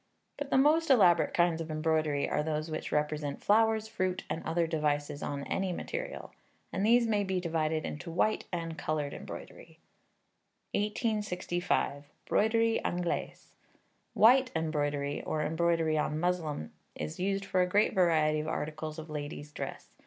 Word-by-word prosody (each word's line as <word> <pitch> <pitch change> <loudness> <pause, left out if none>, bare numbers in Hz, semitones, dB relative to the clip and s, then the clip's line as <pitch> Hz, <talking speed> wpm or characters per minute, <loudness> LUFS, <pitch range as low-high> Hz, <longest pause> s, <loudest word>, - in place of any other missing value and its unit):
But 285 -1 -4
the - - +3
most 310 +4 +4
elaborate 180 -10 +5
kinds 170 -2 +2
of 165 - -6
embroidery 155 -2 +1
are - - 0
those 155 +1 -2
which 155 - -4
represent 150 -1 -1
flowers, 220 +1 +3
fruit, 185 -4 -2
and 160 - -3
other 170 0 +1
devices 150 -2 -1
on 140 -1 -3
any 190 +4 -1
material; 175 - -5 0.4
and 195 - -1
these 235 +2 +5
may 210 -2 +1
be 190 -1 -1
divided 160 -2 -1
into 165 +4 -6
white 180 +6 +1
and 165 -2 -4
coloured 150 -2 -2
embroidery. - - -9 1.0
1865. 200 - -1 0.2
Broderie 225 +1 +2
Anglaise. 175 -1 -3 0.6
White 255 +4 +6
embroidery, 145 -3 -1
or 155 -1 -2
embroidery 165 -1 +1
on 150 0 -1
muslin, 160 - -1 0.2
is 75 0 -5
used 195 +1 0
for 185 -1 +1
a 180 - +2
great 205 +3 +3
variety 155 -4 +3
of 155 - -3
articles 155 0 -4
of 160 0 -7
ladies' 145 -1 -6
dress. 105 - -7
165 Hz, 145 wpm, -31 LUFS, 155-195 Hz, 1.0 s, White